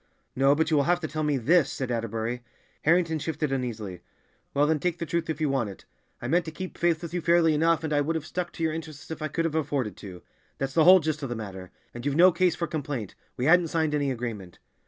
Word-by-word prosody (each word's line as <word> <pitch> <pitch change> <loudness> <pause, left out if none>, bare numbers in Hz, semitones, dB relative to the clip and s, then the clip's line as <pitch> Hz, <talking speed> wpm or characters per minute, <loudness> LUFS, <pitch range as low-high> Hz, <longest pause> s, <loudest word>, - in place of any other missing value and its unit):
"No, 135 +2 +4
but 160 +1 0
you 155 - +4
will 140 - +3
have 175 +1 +2
to 155 - -2
tell 155 0 -4
me 150 -2 +1
this," 150 +4 +3
said 130 -2 -3
Atterbury. 115 +1 -2 0.4
Harrington 165 0 +3
shifted 150 -1 -2
uneasily. 110 -9 -4 0.5
"Well, 145 +1 +3
then, 155 0 +1
take 175 +2 -1
the 170 - -3
truth 165 +1 -2
if 155 - -2
you 155 - +1
want 135 -6 0
it. 95 - -12 0.4
I - - -2
meant 175 +1 +2
to 160 - -5
keep 185 +3 -7
faith 170 -1 +1
with 170 -1 -6
you 175 - -1
fairly 170 -1 +4
enough, 165 +2 +2
and 155 -1 -2
I 145 - +3
would 160 +3 -1
have 160 -1 -3
stuck 175 0 -4
to 165 - -5
your 160 -1 +1
interests 155 -2 -8
if 160 - -6
I 155 - -1
could 165 +3 -1
have 165 - -1
afforded 140 - -1
to—that's 100 +7 -8
the 160 +1 +4
whole 185 +1 +9
gist 155 0 -2
of 135 - -4
the 120 - -3
matter. 95 -4 -7 0.2
And 120 - -8
you've 140 0 -1
no 180 +3 +7
case 180 0 +2
for 170 - -2
complaint; 140 - -4 0.2
we 125 - -1
hadn't 175 +2 +5
signed 160 -1 0
any 145 -2 +1
agreement." 115 -8 -5
150 Hz, 255 wpm, -27 LUFS, 130-165 Hz, 0.5 s, whole